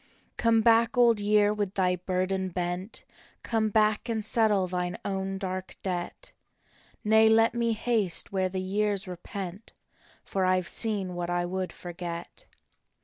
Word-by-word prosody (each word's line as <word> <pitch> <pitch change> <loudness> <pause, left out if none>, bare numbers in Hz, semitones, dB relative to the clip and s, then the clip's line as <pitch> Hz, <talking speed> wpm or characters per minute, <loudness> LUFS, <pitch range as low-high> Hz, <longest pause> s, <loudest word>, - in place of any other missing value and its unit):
" - - -36
Come 230 -1 +3
back, 230 +1 +3
Old 235 -3 +5
Year, 205 0 +3
with 205 -2 -3
thy 180 -2 +2
burden 185 +1 -2
bent. 180 +3 -4 0.4
Come 220 -2 0
back 215 +2 +1
and 220 -2 -1
settle 215 -4 +3
thine 180 -1 -3
own 195 0 -2
dark 185 -1 -5
debt." 180 -2 -5 0.3
" - - -34 0.3
Nay, 220 +1 +5
let 225 +1 +4
me 235 -1 0
haste 220 -5 +1
where 190 -1 0
the 185 0 -3
years 200 +1 -1
repent, 185 +2 -7 0.5
For 190 - -2
I 185 0 +3
ve 175 - -9
seen 205 -5 0
what 175 0 -4
I 175 0 0
would 185 +1 -3
forget." 175 - -8
195 Hz, 155 wpm, -28 LUFS, 185-220 Hz, 0.5 s, Old